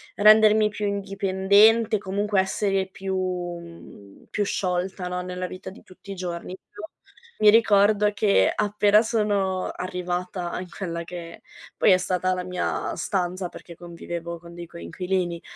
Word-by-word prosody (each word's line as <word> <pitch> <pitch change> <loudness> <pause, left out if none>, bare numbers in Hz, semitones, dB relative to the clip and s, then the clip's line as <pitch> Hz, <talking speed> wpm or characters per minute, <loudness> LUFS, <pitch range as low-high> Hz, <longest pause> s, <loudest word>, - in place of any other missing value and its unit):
rendermi 215 0 +6
più 210 0 -3
indipendente, 200 +3 +3
comunque 200 +1 -1
essere 195 0 0
più, 190 0 -5
mhmm, 175 - -6
più 205 - -1
sciolta, 180 -1 -2
no, 180 0 -3
nella 180 0 -5
vita 185 - -8
di 190 - -14
tutti 190 +2 -13
i - - -5
giorni, 180 0 -5
più 205 - -14 0.6
mi 215 - +7
ricordo 210 -1 +4
che 205 -1 +3
appena 210 0 +3
sono 205 -5 0
arrivata 180 0 -4
in 185 - -9
quella 170 -3 -5
che 170 -1 -9 0.3
poi - - +4
è 185 - +6
stata 185 0 0
la 180 0 -3
mia 180 0 -2
stanza, 180 0 -2
perché 170 - -12
convivevo 170 0 -7
con 170 0 -13
dei 175 0 -7
coinquilini, 175 - -3
185 Hz, 145 wpm, -24 LUFS, 180-205 Hz, 0.6 s, mi